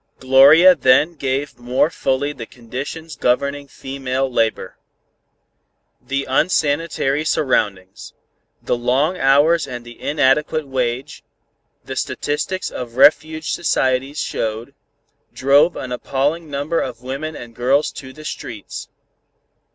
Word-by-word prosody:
Gloria 140 +8 +7
then 140 +3 +3
gave 140 -2 -3
more 125 +6 +1
fully 140 +1 -1
the 115 -5 -8
conditions 135 +6 -7
governing 140 +2 0
female 135 -1 -3
labor. 115 -2 -1 1.2
The 140 +1 -3
unsanitary 150 0 0
surroundings, 100 - -1 0.5
the - - 0
long 130 +9 0
hours 145 +4 +3
and 120 -2 -7
the 120 0 -13
inadequate 150 +1 +1
wage, 130 +1 -3 0.6
the - - -6
statistics 150 +6 -3
of 120 -2 -7
refuge 155 +3 +3
societies 135 -3 0
showed, 110 +1 -3 0.6
drove 140 +5 +4
an 130 - -6
appalling 145 +6 -2
number 145 +4 -1
of 125 -2 -5
women 140 +5 -5
and 120 -1 -10
girls 135 +5 +1
to 130 -1 -10
the 155 +3 -13
streets. 110 -8 -7
135 Hz, 110 wpm, -19 LUFS, 125-150 Hz, 1.2 s, Gloria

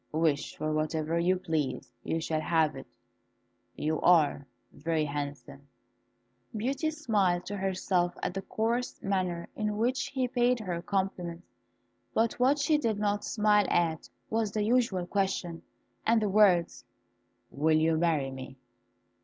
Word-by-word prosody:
"Wish 155 -2 0
for 155 0 -2
whatever 155 +1 -1
you 180 +2 +3
please, 150 -8 -2
you 165 - -1
shall 160 -1 -1
have 160 -1 +2
it. 135 - -9 0.9
You 155 0 -1
are 155 -5 +4 0.2
very 160 0 -1
handsome." 140 -1 -6 0.9
Beauty 270 +8 -1
smiled 210 - 0
to 205 - -4
herself 185 -2 0
at - - -1
the 195 - -3
coarse 230 +5 -2
manner 185 -3 -1
in 210 -1 -2
which 245 +4 0
he 260 -2 -1
paid 245 0 +2
her 180 -5 -3
compliments; 180 -3 -3 0.7
but 230 +2 +1
what 265 +4 +4
she 300 +1 +2
did 225 -7 0
not 205 0 0
smile 210 -2 +3
at 165 -2 0 0.2
was 220 -2 -1
the 215 - 0
usual 220 -5 +1
question, 180 -3 -1 0.4
and 230 0 +3
the 210 -2 0
words, 190 -4 +3 0.7
"Will 155 +2 +2
you 160 +1 +3
marry 155 -5 +1
me?" 130 0 -9
180 Hz, 140 wpm, -29 LUFS, 160-215 Hz, 0.9 s, are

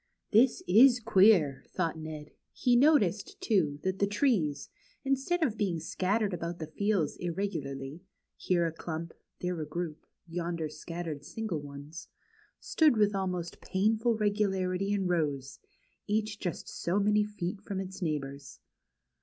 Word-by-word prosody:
This 235 +4 +4
is 240 +7 +7
queer,'' 185 - +4
thought 170 -3 -2
Ned. 155 -1 -7 0.2
He 245 -1 +2
noticed, 280 - +3
too, 185 - +1
that 190 0 -1
the 200 - +3
trees, 205 - +1 0.4
instead 275 +6 +1
of 230 -8 0
being 185 -6 0
scattered 200 +5 0
about 170 0 -4
the 160 - -5
fields 185 -1 0
irregularly, 160 -5 -4 0.3
here 175 -2 +1
a 165 - 0
clump, 165 0 -6 0.3
there 180 -2 -2
a - - -3
group, 160 0 -5 0.2
yonder 170 -1 -3
scattered 155 -1 -6
single 205 0 -4
ones, 145 +3 -9 0.5
stood 305 -7 +3
with 210 -1 +3
almost 180 -3 -3
painful 220 +4 +1
regularity 195 -2 0
in 200 -2 0
rows, 145 -6 -1 0.5
each 215 0 -1
just 180 - -4
so 180 +4 -1
many 210 +1 +3
feet 205 -1 -4
from 200 -2 -4
its 190 +1 -6
neighbors. 140 -4 -4
185 Hz, 135 wpm, -30 LUFS, 160-210 Hz, 0.5 s, is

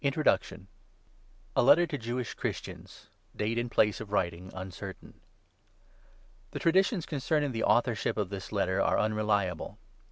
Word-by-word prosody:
TO 140 - +4
HEBREWS 155 +3 +2 1.0
A - - +5
LETTER 145 +7 +6
TO 155 - -4
JEWISH 120 +1 -3
CHRISTIANS. - - -6 0.3
[DATE 110 +3 0
AND 120 0 -2
PLACE 105 -2 +3
OF 105 -2 -8
WRITING 85 -2 -1
UNCERTAIN.] 95 +1 -8 1.4
THE - - -6
Traditions 185 +1 +3
concerning 145 0 0
the 115 -2 -2
authorship 120 -5 +2
of 105 -4 -1
this 95 -2 -6
Letter 100 -2 +1
are - - +2
unreliable. 105 -5 0
110 Hz, 135 wpm, -30 LUFS, 100-140 Hz, 1.4 s, LETTER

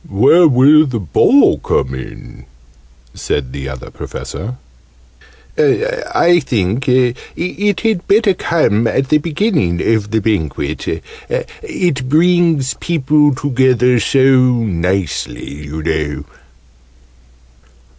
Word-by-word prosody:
"Where 135 - +4
will 145 +3 +5
the 125 -4 -3
Ball 90 -7 +3
come 65 - -1
in?" 65 -1 -10 0.7
said 65 -3 -4
the 70 -1 -6
Other 65 -1 -9
Professor. 120 +6 -7 1.0
"I 175 - +1
think 115 0 -1
it 150 +11 -1
had 220 -5 -1
better 210 -1 +3
come 115 - 0
at 135 +2 -1
the 155 - +3
beginning 155 - -1
of 105 -2 -1
the 110 +1 0
Banquet 80 -8 -3 0.4
it 185 - -3
brings 165 -3 +2
people 150 -3 +1
together 125 -2 +2
so 130 +4 +2 0.3
nicely, 90 - -3
you 75 +2 -6
know." 80 -2 -3
130 Hz, 100 wpm, -15 LUFS, -, 1.0 s, will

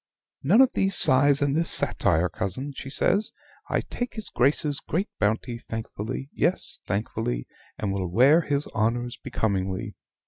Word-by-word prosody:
"None 195 - +5
of 265 - +5
these 195 0 +1
sighs 140 +2 +6
and 140 0 0
this 165 +1 +1
satire, 80 +3 +3
cousin," 100 - -4
she 135 - -7
says. 200 +9 +1 0.4
"I - - +1
take 245 0 -6
his 220 -2 -5
Grace's 145 +2 +1
great 185 +7 -3
bounty 110 +3 -1
thankfully 115 +4 -5
yes, 180 - -1
thankfully; - - -3 0.3
and 100 -2 -2
will 95 -2 -2
wear 135 - +5
his 145 -2 -2
honors 120 +3 -1
becomingly. 100 0 -2
130 Hz, 145 wpm, -25 LUFS, 105-150 Hz, 0.4 s, sighs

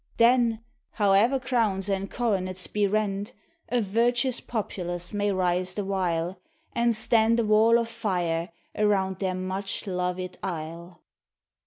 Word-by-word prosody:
Then, 235 -1 +4 0.3
howe'er 210 +5 +3
crowns 225 -7 0
and 195 -1 -1
coronets 185 -6 -1
be 210 -1 +1
rent, 205 0 -1 0.4
A 245 -1 +2
virtuous 240 +4 +1
populace 175 -5 -4
may 205 0 +1
rise 185 -1 0
the 205 - -2
while, 180 -2 -1 0.3
And 235 -1 +2
stand 225 +1 +3
a 230 - +2
wall 220 +2 +5
of 235 -1 0
fire 175 -6 -1 0.3
arouud 195 -3 +1
their 185 -2 -1
much 190 +2 -3
loved 180 -1 -3
isle. 170 0 -6
195 Hz, 130 wpm, -26 LUFS, 185-225 Hz, 0.4 s, wall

